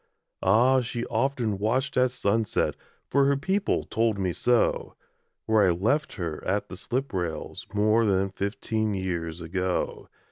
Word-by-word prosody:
Ah! 125 +7 +4
she 120 0 -4
often 125 -7 -1
watched 130 +6 0
at 125 0 +4
sunset 110 -2 0 0.3
For 140 0 +3
her 140 0 +3
people 190 +8 0
told 115 -2 0
me 95 -3 -1
so 120 +5 +1 0.5
Where 110 -1 +4
I 95 - +5
left 115 - +1
her 85 -6 -4
at 100 +2 -1
the - - -7
slip 125 +7 -3
rails 85 -4 -4
More 110 +2 +3
than 95 -1 +1
fifteen 105 +2 -2
years 85 -3 -3
ago. 90 +2 -2
110 Hz, 145 wpm, -26 LUFS, 95-125 Hz, 0.5 s, I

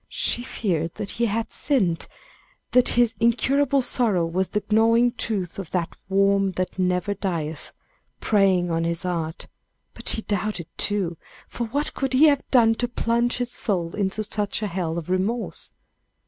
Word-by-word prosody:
She 240 - 0
feared 170 -9 -2
that 200 - -5
he 235 +1 0
had 225 +1 -2
sinned, 190 - 0 0.6
that 250 -1 +5
his 240 -1 +4
incurable 265 +4 +2
sorrow 215 -10 +1
was 180 +3 -1
the 210 - -1
gnawing 230 +2 +4
tooth 200 -7 -2
of 185 -5 -6
that 175 -3 -2
worm 195 0 +3
that 185 +1 -3
never 180 +2 +1
dieth, 160 -6 -4 0.5
preying 190 -4 +2
on 165 0 0
his 170 +1 -1
heart; 165 -3 -3 0.5
but - - -3
she 220 - +1
doubted, 205 -3 -2
too, 190 -5 0 0.3
for 235 - -4
what 285 +6 -2
could 270 -1 -2
he 275 +5 +6
have 285 -2 +2
done 230 -3 +5
to 245 - +1
plunge 235 0 0
his 245 -1 -2
soul 175 -9 -1
in 200 -2 0
such 210 0 -2
a - - +1
hell 170 -4 -2
of 170 - -5
remorse? 195 +6 -2
205 Hz, 160 wpm, -24 LUFS, 180-235 Hz, 0.6 s, he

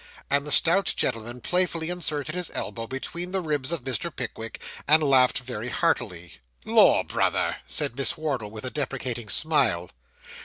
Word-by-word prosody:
And 140 +1 +1
the - - -3
stout 175 +5 +5
gentleman 120 +2 -2
playfully 175 +1 0
inserted 155 -4 -2
his 180 -1 -4
elbow 115 -1 -4
between 170 +8 -5
the 190 - +1
ribs 150 -5 -2
of 165 -7 -3
Mr. 135 +6 -2
Pickwick, 115 -6 -6 0.3
and 155 +2 +6
laughed 130 -2 +4
very 125 -2 -5
heartily. 90 - -2 0.3
'Lor, - - +5
brother!' - - 0
said 120 - 0
Miss 135 0 +2
Wardle, 135 -9 -3
with 110 +3 -9
a 130 - -3
deprecating 130 -6 -4
smile. 125 - +2
135 Hz, 155 wpm, -25 LUFS, 120-160 Hz, 0.3 s, and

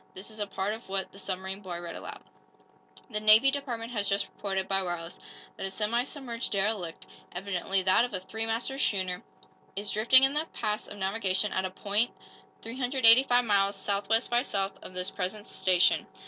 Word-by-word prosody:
This 195 +4 -7
is 215 - -11
a 205 - -1
part 195 +1 -2
of 220 -2 -10
what 195 0 -2
the 195 - -13
submarine 190 0 -4
boy 180 -3 -5
read 170 -1 -7
aloud: - - -8 0.9
_"'The 210 - -1
Navy 215 +5 +7
Department 245 -5 -4
has 205 -4 -1
just 200 0 +1
reported, 195 -2 -3
by 195 0 +2
wireless, 175 -2 -5 0.4
that - - -5
a - - -4
semi 220 +5 0
submerged 255 -5 -5
derelict, 195 -4 -1 0.3
evidently 190 +1 -1
that 185 +5 +5
of 245 - -2
a 190 - -2
three 220 +4 -3
master 240 +4 -2
schooner, 185 -7 0 0.5
is 200 +1 -3
drifting 240 +5 +6
in 270 +1 +4
the 305 +2 -1
paths 215 -2 -2
of 205 - -9
navigation 195 0 0
at 190 - 0
a - - -2
point 205 +5 0 0.5
385 245 0 +4
miles 200 -2 +2
southwest 200 +4 0
by 240 0 +4
south 195 -6 -1
of 185 - -10
this 180 0 -1
present 200 +2 -4
station. 185 -1 +3
205 Hz, 185 wpm, -29 LUFS, 190-230 Hz, 0.9 s, Navy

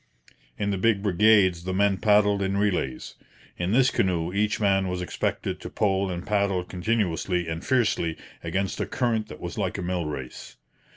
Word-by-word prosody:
In 100 -1 -1
the 95 - -2
big 105 -1 +2
brigades 100 -3 +4
the 95 +1 -3
men 100 0 +2
paddled 105 -1 +3
in 95 0 0
relays. 90 -11 -1 0.5
In 90 +2 -1
this 125 +2 +4
canoe 90 -2 0
each 105 +1 0
man 95 -2 +2
was 90 0 -3
expected 90 - -3
to - - -7
pole 95 -2 0
and 90 -1 -5
paddle 100 -3 +1
continuously 90 -2 -1
and 80 +1 -4
fiercely 110 -10 +1 0.3
against 95 +4 -2
a - - -2
current 115 -3 -1
that - - -10
was - - -6
like - - -1
a 95 - -4
mill 90 -2 -2
race. 65 -4 -7
95 Hz, 175 wpm, -25 LUFS, 90-105 Hz, 0.5 s, brigades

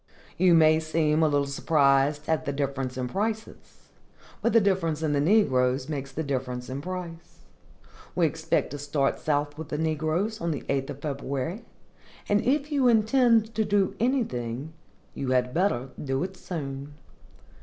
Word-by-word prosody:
You 180 -1 +5
may 155 -1 +5
seem 155 -1 +1
a 160 - +5
little 145 -1 +1
surprised 140 0 +2
at 160 -1 0
the 140 - -1
difference 135 -2 -3
in 125 -1 -2
prices, 220 - -5 0.5
but 235 - +2
the 230 - +6
difference 175 -6 0
in 150 -2 +1
the 140 - +2
negroes 130 -8 +2
makes 140 -3 -4
the 160 +4 -3
difference 125 -3 -3
in 135 +2 -4
price. 175 -1 -7 0.7
We 175 - +3
expect 160 +1 0
to 145 - -6
start 145 -1 0
south 145 0 -1
with 160 - -7
the 150 - -2
negroes 160 +7 -1
on 170 - -1
the 150 - -3
8th 140 0 -2
February, 140 - -3 0.6
and 205 0 +3
if 285 +3 0
you 275 -3 +3
intend 230 0 +4
to 220 0 +1
do 205 -2 +1
anything, 150 - -1 0.4
you 135 - -4
had 125 0 +1
better 160 -9 0
do 135 +1 -1
it 190 +1 -5
soon. 145 -5 -6
155 Hz, 160 wpm, -26 LUFS, 140-190 Hz, 0.7 s, the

